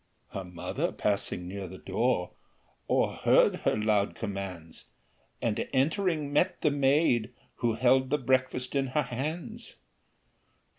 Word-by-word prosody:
Her 95 - -5
mother 90 0 -3
passing 100 -3 -1
near 95 +1 -5
the 95 +2 -9
door, 95 -1 0 0.6
O'erheard - - +3
her - - 0
loud 105 -2 +1
commands, 95 -6 -6 0.6
And 110 -3 -1
entering, 155 +1 +1
met 180 +6 +2
the 150 - +3
maid, 135 -4 +2 0.3
who 115 -2 0
held 130 +2 +3
The 150 - +2
breakfast 130 -1 0
in 135 -1 +1
her 150 - +4
hands. 160 - -5
125 Hz, 120 wpm, -29 LUFS, 100-140 Hz, 0.6 s, her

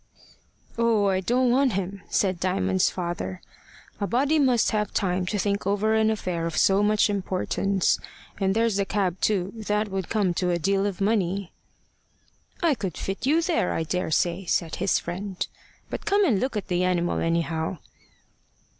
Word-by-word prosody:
"Oh, 225 -4 +3
I 190 -1 +1
don't 245 +5 +2
want 260 -1 +3
him," 195 +1 -3
said 185 -3 +1
Diamond's 95 - +1
father. 170 - -4 0.6
"A 200 - -1
body 280 +7 +2
must 255 -5 +3
have 210 -2 -1
time 185 -2 0
to 210 - -1
think 200 -1 -1
over 205 +2 +1
an 220 0 +3
affair 180 -6 -2
of 165 - -4
so 195 +1 +4
much 210 0 +3
importance. 195 -1 0 0.4
And 195 0 +1
there's 225 -2 +2
the 200 - +1
cab 190 -3 -1
too. 195 -3 +1
That 210 -1 -1
would 190 -2 -3
come 205 -5 +1
to 180 +1 0
a 175 - +1
deal 195 +4 +1
of 200 -1 -5
money." 195 -3 0 1.1
"I 330 -3 +4
could 195 - -4
fit 195 +7 -3
you 320 +4 +3
there, 335 -1 +1
I 165 - -1
daresay," 175 +2 0
said 165 -2 -1
his 195 +1 +2
friend. 185 +2 -4 0.5
"But - - -5
come 405 0 +4
and 230 - +2
look 260 -1 -1
at 205 - -4
the 180 0 0
animal, 175 -1 +1
anyhow." 165 +1 -1
195 Hz, 170 wpm, -25 LUFS, 180-215 Hz, 1.1 s, so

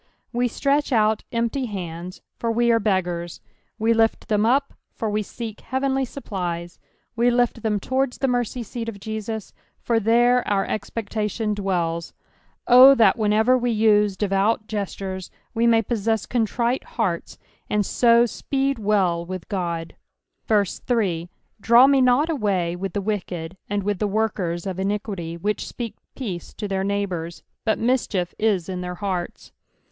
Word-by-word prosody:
We 245 +1 +1
stretch 280 +4 0
out 215 -2 +3
empty 235 +2 -1
hands, 180 -3 -6 0.2
for 230 - 0
we 235 +1 +3
are 230 - +4
beggars; 180 -5 -1 0.4
we 225 +1 +2
lift 225 0 +1
ttiem 210 0 +2
up, 275 +3 +2 0.2
for 220 -2 -2
we 210 +1 0
seek 220 +1 -7
heavenly 265 0 0
supplies; 175 -9 -5 0.4
we 235 +1 +3
lift 240 -1 +1
them 210 -2 0
towards 260 +4 -1
the 270 - 0
merry 245 -1 +1
seat 230 0 -5
of 200 -3 -8
Jesus, 220 0 -5 0.3
for 230 -1 +1
there 240 +3 +4
our 200 -1 +1
expectation 215 0 -2
dwells. 175 -5 -2 0.5
O 255 +3 +9
that 220 -6 +5
whenever 220 +3 +3
we 245 -1 0
use 210 -3 +3
devout 205 +2 +1
gestures, 195 -3 -4 0.2
we 235 0 +2
may 225 -1 +4
possess 220 -2 -1
contrite 240 +1 0
hearts, 170 -5 -1 0.3
and 210 -1 +1
so 235 +2 +4
speed 270 +2 -1
well 195 -5 +1
wltli 170 -2 -4 0.6
Ood. 205 -3 +4 0.2
3 185 -8 0 0.3
Draw 235 +5 +7
me 275 -1 +4
not 255 +4 +4
away 200 - 0
with 190 +1 -4
the 205 - -1
wicked, 185 -4 -3
and 205 0 -1
with 205 -1 -1
the 210 - +1
workers 195 -5 -1
of 190 -1 -4
iniquity, 195 -4 -3
which 205 +5 -2
speak 230 -4 -5 0.2
peace 195 -10 -6
to 210 - -4
their 190 -1 -1
neighbours, 190 -4 -3 0.2
but 220 - +1
mischief 225 -7 0
is 205 -6 +1
in 185 -1 -4
their 180 0 -5
hearts. 185 -2 -4
210 Hz, 150 wpm, -23 LUFS, 190-235 Hz, 0.6 s, O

